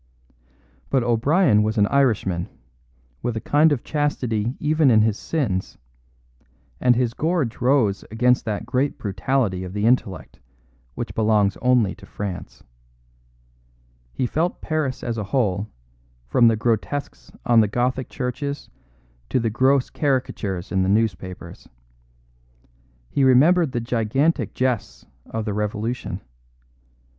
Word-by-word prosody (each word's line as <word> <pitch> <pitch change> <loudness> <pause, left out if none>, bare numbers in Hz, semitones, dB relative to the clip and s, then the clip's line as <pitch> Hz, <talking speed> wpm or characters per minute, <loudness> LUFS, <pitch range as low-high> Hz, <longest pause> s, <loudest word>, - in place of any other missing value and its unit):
But 135 -3 +2
O'Brien 120 - +3
was 110 +2 -1
an 105 - +5
Irishman, 105 -9 +1 0.7
with 120 -2 -2
a - - -1
kind 150 +7 +3
of 140 -5 -1
chastity 125 -6 -1
even 155 -1 +3
in 110 -3 +5
his 110 -2 +1
sins; 110 - -2 1.0
and 125 -1 +4
his 120 -1 0
gorge 155 -7 -1
rose 120 -6 +2
against 125 +3 +2
that 105 -3 -3
great 135 +2 -1
brutality 100 -1 -1
of 90 0 -7
the 105 +1 -1
intellect 115 -6 0 0.6
which - - -5
belongs 105 -3 +2
only 125 -6 +3
to - - -15
France. 100 -3 -7 1.5
He 125 - -2
felt 165 +8 -1
Paris 145 -5 -2
as 115 -2 -3
a 105 - -3
whole, 100 -2 0 0.6
from 115 - +4
the 115 - +4
grotesques 110 - -2
on 120 -1 +5
the 110 - +4
Gothic 125 +4 -1
churches 140 +3 -4 0.6
to 130 - +1
the 115 -2 -1
gross 130 +3 +2
caricatures 115 - -2
in 95 - +1
the 95 - +1
newspapers. 95 -5 -2 1.4
He 140 - +1
remembered 145 +5 +5
the 120 - -1
gigantic 120 +7 0
jests 125 -4 -2 0.2
of 110 -1 -4
the 105 - -2
Revolution. 105 -1 -3
120 Hz, 130 wpm, -22 LUFS, 105-135 Hz, 1.5 s, an